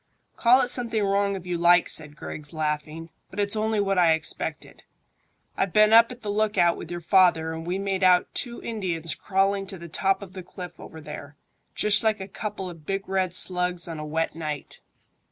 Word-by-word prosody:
"Call 250 +3 +5
it 245 - 0
something 230 -4 +2
wrong 200 0 +1
if 185 -2 -8
you 175 -1 -3
like," 175 +1 +5
said 150 -2 +1
Griggs, 150 0 -6
laughing; 155 +1 -4 0.2
"but 190 - -8
it's 205 +1 -1
only 220 0 0
what 195 -2 +1
I 170 -2 +5
expected. 160 0 -4 0.7
I've 195 -3 -1
been 215 0 +5
up 230 +2 +7
at 250 0 -11
the 205 - -2
lookout 205 -5 +2
with 165 - -9
your 175 0 -5
father, 170 -2 +3
and 165 +1 -7
we 180 +2 -1
made 195 -1 -2
out 180 -1 +4
two 240 -2 -4
Indians 175 - -2
crawling 195 +5 0
to 190 - -5
the 170 0 -10
top 195 +4 0
of 185 -2 -12
the 185 - -7
cliff 180 0 -10
over 160 - -11
there, 145 -1 -9 0.4
just 210 +1 +3
like 215 -1 +1
a 190 - -6
couple 200 -1 -6
of 165 -3 -10
big 195 0 -3
red 185 -2 0
slugs 180 -3 +1
on 165 -2 -6
a - - -5
wet 160 +2 -2
night." 155 -3 -6
185 Hz, 205 wpm, -25 LUFS, 165-205 Hz, 0.7 s, up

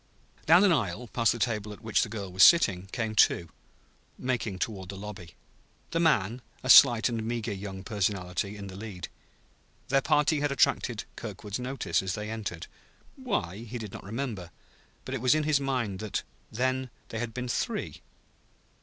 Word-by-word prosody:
Down 175 +5 +7
an 200 - +5
aisle, 115 - -1
past 115 -2 +2
the - - -3
table 110 -3 -1
at 105 - -11
which 110 -1 +2
the 110 - -1
girl 100 -4 -6
was 95 - 0
sitting, 95 - +6
came 110 +1 -3
two, 85 -5 +3 0.7
making 120 -6 -2
toward 95 -1 -4
the 100 - -6
lobby; 100 -4 -9 0.6
the 165 - 0
man, 125 - +2 0.2
a 130 - +5
slight 120 -5 +8
and 115 -2 -2
meager 115 -1 -2
young 95 -1 -7
personality, 100 -1 -2
in 100 - -7
the 95 -1 -9
lead. 100 -4 -7 0.8
Their 135 +1 +3
party 150 +1 +2
had 145 0 0
attracted 120 -4 +1
Kirkwood's 105 0 -6
notice 130 0 -1
as 95 -1 -3
they 105 +1 -5
entered; 100 -7 -5 0.5
why, 200 - -2
he 120 +2 -7
did 110 -4 -7
not - - -8
remember; 105 -4 -4 0.6
but 130 - -5
it 135 - -3
was 130 +3 +4
in 155 - +1
his 150 -2 +2
mind 125 -8 -2
that 110 -1 -3 0.3
then 130 +2 -1 0.2
they 110 - -4
had 120 0 -3
been 125 +1 -4
three. 120 - -3
110 Hz, 175 wpm, -28 LUFS, 100-130 Hz, 0.8 s, slight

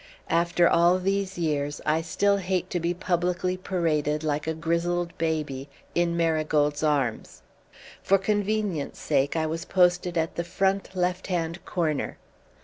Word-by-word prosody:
After 170 +1 +3
all 175 +2 +4
these 195 0 -1
years, 145 -3 -1
I 155 +1 +2
still 200 +5 +1
hate 185 -1 -2
to 175 - 0
be 170 +1 0
publicly 180 0 0
paraded, 160 -5 -1
like 150 0 -1
a 160 - -1
grizzled 170 +1 -1
baby, 150 -4 -2 0.2
in 170 0 +1
Marigold's 155 -3 +1
arms. 135 - -1 0.6
For 195 - +4
convenience' 205 -5 -1
sake 140 0 0
I 160 -1 +1
was 165 +1 -3
posted 180 -1 +2
at 160 0 -1
the 170 - 0
front 195 +2 -1
left 180 0 -1
hand 170 -1 -2
corner. 155 -5 -1
170 Hz, 140 wpm, -26 LUFS, 155-180 Hz, 0.6 s, all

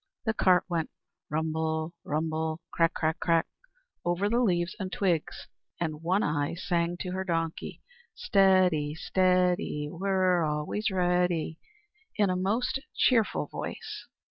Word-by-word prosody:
The 220 - +1
cart 185 -4 +4
went 170 -3 -1 0.4
rumble, 160 +1 -1
crumble, 155 +1 -2
crack, 165 -1 +2
crack, 160 0 0
crack, 165 -1 +2 0.6
over 175 +4 0
the 235 +2 +2
leaves 180 -6 +1
and 190 -2 -4
twigs, 175 -5 -1 0.3
and 155 -3 -3
One 185 +5 +1
Eye 145 +1 0
sang 175 -1 -1
to 180 - -3
her 190 +1 -2
donkey: 165 -3 -3 0.3
"Steady, 185 - +3
steady, 180 -4 +1
We're 185 -1 +2
always 150 +8 -1
ready," 180 -3 +1 0.6
in 205 -3 +2
a - - 0
most 230 +8 0 0.2
cheerful 230 -5 +3
voice. 435 -2 -7
175 Hz, 125 wpm, -28 LUFS, 160-190 Hz, 0.6 s, cart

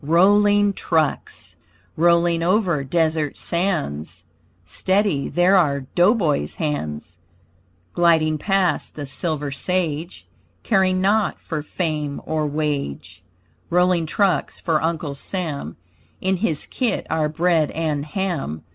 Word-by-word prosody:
ROLLING 205 +5 +4
TRUCKS 160 -5 -2 0.4
Rolling 170 0 +3
over 175 -4 +1
desert 155 0 0
sands 95 - -2 0.4
Steady 185 - 0
there 180 +3 +3
are 145 -7 +3
dough 185 +7 +4
boy's 150 - 0
hands. 85 - -4 0.7
Gliding 160 -3 +3
past 190 -3 0
the 145 - -5
silver 145 +1 -3
sage 160 - -2 0.4
Caring 185 -3 +2
naught 205 +2 +1
for 155 -3 -4
fame 150 -2 -3
or 155 -1 -1
wage; 140 - -3 0.5
Rolling 180 -1 +2
trucks 185 -2 0
for 160 -4 0
Uncle 160 -3 -2
Sam, 145 - -5 0.4
In 190 0 0
his 170 -6 +1
kit 250 -3 -2
are 155 -1 +1
bread 165 -1 +1
and 155 -3 -2
ham. 150 - -3
160 Hz, 110 wpm, -21 LUFS, 145-185 Hz, 0.7 s, ROLLING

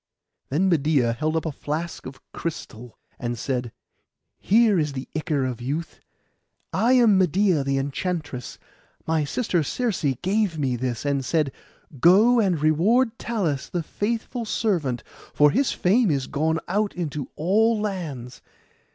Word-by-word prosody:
Then 165 +8 +1
Medeia 145 -8 +2
held 155 +7 -1
up 160 - -1
a 160 - -1
flask 155 +3 -5
of 135 +1 -10
crystal, 125 -8 -6 0.2
and 120 0 -3
said, 125 -1 -3 0.7
'Here 215 -2 +4
is 150 -2 -1
the 130 -1 -6
ichor 155 -4 0
of 125 -2 -4
youth. 145 +7 -4 0.7
I 240 +3 +3
am 230 -6 +5
Medeia 185 -3 +2
the 135 0 0
enchantress; 145 -1 -3 0.5
my 160 -2 +1
sister 180 - 0
Circe 220 - -2 0.2
gave 195 -2 +1
me 135 -4 0
this, 120 +1 -3
and 140 -1 0
said, 150 +1 0 0.5
"Go 210 - +6
and 190 -7 +2
reward 205 - +2
Talus, 175 - -2
the 175 -2 -2
faithful 230 +7 -3
servant, 170 - -1 0.3
for 150 0 +5
his 265 +4 +1
fame 210 +4 +2
is 140 -4 0
gone 160 +3 0
out 205 +3 0
into 150 -5 -4
all 215 +7 +2
lands." 150 - -5
160 Hz, 145 wpm, -24 LUFS, 140-205 Hz, 0.7 s, Go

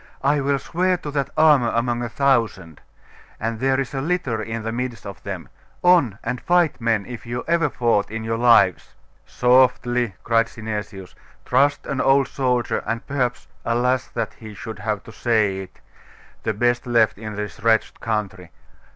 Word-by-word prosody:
'I 145 +1 +2
will 140 0 +1
swear 180 +6 0
to 150 -3 -7
that 140 -2 -1
armour 150 -7 +5
among 120 0 0
a 120 - -3
thousand. 115 - 0 0.6
And 115 0 -3
there 135 +1 +2
is 135 -1 -3
a 135 - -2
litter 140 -8 -1
in 115 +1 -5
the 115 - -3
midst 120 0 -4
of 100 - -8
them. - - -6 0.4
On! 170 - +4
and 120 +1 -3
fight, 175 -6 +2
men, 115 -3 +1
if 120 -1 -9
you 120 +1 -3
ever 165 -2 +2
fought 115 -5 +1
in 110 +1 -5
your 115 0 -2
lives!' 115 -7 +4 0.3
'Softly!' 125 -3 +2
cried 115 0 +2
Synesius. 105 -4 -6 0.3
'Trust 145 +1 +2
an 140 - -2
old 135 -1 +4
soldier, 125 -3 0
and 115 +1 -3
perhaps 130 -3 -2 0.2
alas! 125 +2 +1
that 115 -3 -4
he 110 -2 -11
should 105 +1 -8
have 105 -1 -2
to - - -12
say 110 -5 +1
it 95 -1 -10 0.6
the 110 - -1
best 120 +4 +1
left 115 -4 +2
in 110 -1 -6
this 105 +2 -5
wretched 110 0 +1
country. 100 -5 -3
120 Hz, 170 wpm, -22 LUFS, 110-135 Hz, 0.6 s, armour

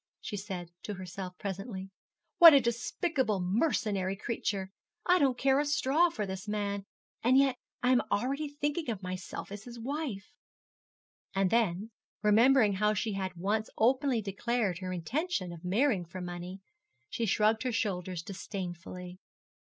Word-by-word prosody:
she - - -5
said 190 -4 -6
to 210 - -5
herself 185 0 -7
presently; 195 -1 -5 0.5
'what 330 -3 +11
a - - +8
despicable, 235 - 0
mercenary 195 - 0
creature! 195 -2 -3 0.3
I 360 0 +5
don't 265 -3 +3
care 270 +1 +3
a 295 - +1
straw 295 +3 +3
for 215 -11 -3
this 190 +1 -6
man; 200 -1 -2 0.3
and 250 +3 +4
yet 270 -2 +4 0.3
I 250 - +4
am 250 - +5
already 275 +7 0
thinking 290 +1 -2
of 205 -4 -3
myself 185 +1 -6
as 205 0 -7
his 240 -1 -9
wife.' 275 -2 -4 1.0
And 195 -1 +2
then, 220 -2 +1 0.3
remembering 220 +1 +5
how 210 +2 +2
she 215 +2 -1
had 190 -2 -3
once 205 +5 -1
openly 255 0 +2
declared 200 -1 -1
her 185 -1 -4
intention 185 - -2
of 170 0 -11
marrying 200 +1 +2
for 170 +3 -8
money, 180 +1 -6 0.5
she 225 +8 -2
shrugged 215 +3 +3
her 255 - -1
shoulders 185 -5 -2
disdainfully. 180 -1 -6
210 Hz, 150 wpm, -31 LUFS, 185-255 Hz, 1.0 s, what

